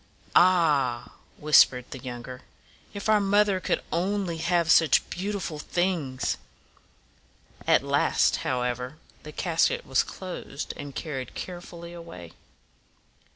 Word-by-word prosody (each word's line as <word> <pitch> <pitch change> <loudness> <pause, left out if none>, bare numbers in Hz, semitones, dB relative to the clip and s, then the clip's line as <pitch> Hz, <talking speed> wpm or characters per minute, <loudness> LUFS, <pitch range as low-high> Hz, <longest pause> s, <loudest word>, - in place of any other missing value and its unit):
"Ah!" 150 -9 +3 0.3
whis 150 0 +7
pered 125 -1 -7
the 130 - -7
younger; 125 +1 -8 0.5
"if 200 0 -6
our 215 -1 +5
mother 200 -1 +3
could - - -1
only 185 0 -1
have 170 0 +1
such 160 -2 +5
beautiful 185 -4 -4
things!" 150 -8 -1 1.3
At - - +4
last, - - +2
how 125 -1 -1
ever, 125 +3 -3 0.2
the 150 - -10
casket 165 +1 0
was 135 0 +2
closed 180 -6 -6
and 140 -1 -8
carried 135 -6 -5
care 175 -1 -6
ful 170 -1 -11
ly 170 - -8
away. 90 - -10
165 Hz, 125 wpm, -26 LUFS, 130-180 Hz, 1.3 s, whis